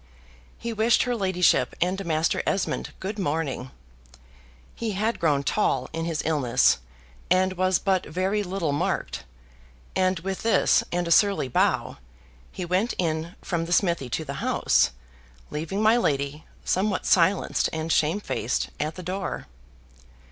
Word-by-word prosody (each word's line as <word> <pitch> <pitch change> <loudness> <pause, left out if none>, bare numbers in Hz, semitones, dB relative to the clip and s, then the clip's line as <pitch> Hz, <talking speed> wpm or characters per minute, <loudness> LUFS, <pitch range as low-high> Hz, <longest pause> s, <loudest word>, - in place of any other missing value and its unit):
He 235 0 -4
wished 220 +2 +3
her 245 -1 -1
ladyship 185 -5 +2
and 185 +3 0
Master 160 -2 +1
Esmond 195 - -1
good 205 +2 -4
morning 145 -6 -2 1.0
he 225 -2 -3
had 215 +4 -1
grown 145 -4 +2
tall 135 -8 0
in 165 0 -2
his 165 -2 -2
illness, 145 -7 +3 0.5
and 185 +1 +3
was 185 0 +2
but 190 -2 0
very 185 +6 0
little 185 -5 -2
marked; 145 - -2 0.7
and 185 -1 +2
with 190 +1 -4
this, 230 - +3
and 175 0 -1
a - - -2
surly 195 -6 +4
bow, - - +1 0.5
he 180 - -5
went 185 +7 0
in 165 0 -2
from 165 -2 -1
the 175 - -2
smithy 170 -8 +1
to 160 +6 -2
the 140 - -5
house, - - +3 0.6
leaving 165 +7 -2
my 220 +2 +5
lady, 140 - -1 0.2
somewhat 195 +1 0
silenced 185 +2 +3
and 160 +1 -3
shamefaced, 155 - 0
at 155 +2 -2
the 185 - -8
door. 190 +3 -4
180 Hz, 140 wpm, -25 LUFS, 155-195 Hz, 1.0 s, my